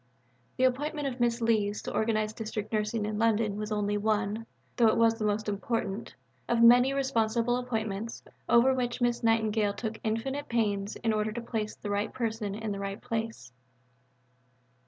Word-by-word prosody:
The 255 - +1
appointment 290 +3 +1
of 255 -1 -5
Miss 235 0 +1
Lees 210 -3 +1
to - - -5
organize 215 -1 0
District 215 -1 -5
Nursing 215 0 0
in 210 0 -3
London 220 -2 +2
was 210 +1 -4
only 205 0 0
one, 215 +1 0 0.3
though 235 -3 +5
it 220 - +3
was 230 -1 +5
the 215 - -1
most 210 +1 0
important, 205 0 -3 0.3
of 235 -1 +3
many 245 +3 +7
responsible 240 -3 +1
appointments, 225 -3 -3 0.3
over 245 +3 +5
which 245 -2 -2
Miss 240 -1 +1
Nightingale 220 -2 +2
took 220 0 -5
infinite 265 +6 -2
pains 205 -3 0
in 225 -2 0
order 215 0 0
to 235 - -4
place 220 -2 -3
the 205 - -6
right 205 +1 -1
person 220 -4 -3
in 220 0 -4
the 200 - -4
right 200 0 -4
place. 225 - -4
225 Hz, 170 wpm, -29 LUFS, 210-235 Hz, 0.3 s, many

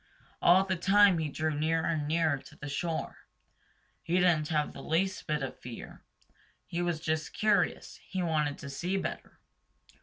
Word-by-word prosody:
All 180 +2 +6
the 190 -1 0
time 195 0 +5
he 155 -2 -1
drew 155 +2 -1
nearer 160 +2 0
and 160 -3 -1
nearer 160 -2 +1
to - - -15
the 145 - -8
shore. 160 +3 -3 0.8
He 170 - -1
didn't 175 -4 +3
have 150 -1 0
the - - -9
least 190 +4 -1
bit 150 -2 0
of 135 - -6
fear. 120 -2 -9 0.6
He 170 - -3
was 175 -2 -1
just 155 -1 -2
curious. 210 -1 +1
He 190 -2 -2
wanted 150 -3 0
to 140 - -8
see 180 +7 -2
better. - - -5
160 Hz, 170 wpm, -30 LUFS, 150-180 Hz, 0.8 s, All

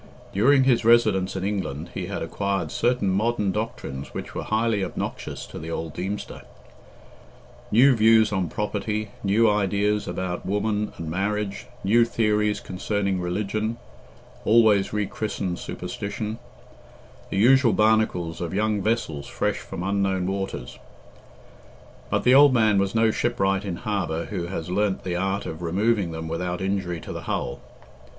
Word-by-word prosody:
During 130 +7 +5
his 130 -3 +3
residence 110 -5 +4
in 95 - -3
England, 90 -6 -3
he - - -4
had - - -4
acquired 100 -1 -2
certain 120 -6 +1
modern 105 0 +1
doctrines 95 -10 -5
which - - -6
were - - -3
highly 110 -2 0
obnoxious 90 - -5
to - - -9
the 80 - -7
old 80 -1 -4
Deemster. 100 +3 -5 1.3
New 125 +5 +6
views 110 -1 +5
on 95 -4 -1
property, 105 +2 -2
new 105 +3 +4
ideas 105 0 +1
about 90 0 -3
woman 105 +2 -1
and 80 - -6
marriage, 100 +2 -2 0.2
new 115 +5 +5
theories 105 -2 +1
concerning 95 0 -2
religion 105 +5 -2 0.7
(always 110 -3 +4
re 105 0 0
christened 95 -4 -3
superstition), 105 +2 -5 0.9
the - - -3
usual 125 +3 +5
barnacles 105 -7 +1
of 85 +2 -3
young 105 0 +1
vessels 95 -10 -1
fresh - - -1
from 90 - -7
unknown 95 -1 0
waters; 95 -9 -4 1.3
but - - 0
the 125 - +5
old 140 -1 +7
man 110 -3 +4
was 100 +2 0
no 110 0 +4
shipwright 95 -5 0
in 95 -4 -3
harbour 85 -5 -2
who 90 -4 -4
has 85 -3 -5
learnt 95 +1 0
the 90 -2 -2
art 95 +2 -1
of 80 +1 -6
removing 100 +3 +1
them 80 0 -5
without 90 +2 -3
injury 95 -3 -2
to - - -7
the - - -6
hull. - - -2
100 Hz, 145 wpm, -24 LUFS, 95-110 Hz, 1.3 s, old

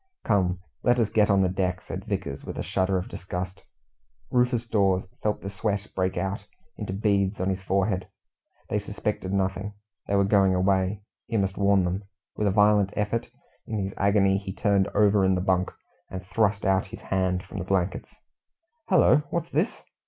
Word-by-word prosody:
"Come, 95 -4 +2 0.2
let 120 0 +3
us 115 -3 +1
get 105 -1 +3
on 100 -1 +4
deck," 90 -1 0
said 95 +2 -7
Vickers, 95 -10 -4
with - - -7
a - - -2
shudder 95 0 0
of 90 - -3
disgust. 95 +1 -5 0.7
Rufus 125 -1 +2
Dawes 95 -4 +2 0.2
felt 105 -1 -1
the 100 - -5
sweat 100 +1 -2
break 95 -1 0
out 100 +3 -3 0.3
into 105 -3 -5
beads 100 0 +1
on 95 +1 0
his 95 0 -3
forehead. 95 0 0 0.6
They 105 - 0
suspected 105 -1 -3
nothing. 100 +1 -1 0.3
They 100 - +1
were 100 - +4
going 95 -1 +4
away. 95 +2 +1 0.2
He 115 - -1
must 95 -1 0
warn 100 -1 +3
them. 90 +3 -2 0.3
With 105 - 0
a - - +3
violent 105 -1 +4
effort, 105 +2 -1 0.4
in 110 - -3
his 95 -1 -2
agony 100 -1 +3
he 95 -1 -6
turned 100 -1 +2
over 105 -1 +4
in 95 0 +3
the - - 0
bunk 95 -1 +1 0.4
and 95 -1 -7
thrust 100 +1 +1
out 95 -1 +2
his - - -10
hand 95 -1 0
from - - -7
the - - -2
blankets. 95 -2 -1 0.8
"Hullo! 180 -5 +6
what's 170 -1 -3
this?" 160 - -1
100 Hz, 180 wpm, -26 LUFS, 95-105 Hz, 0.8 s, Hullo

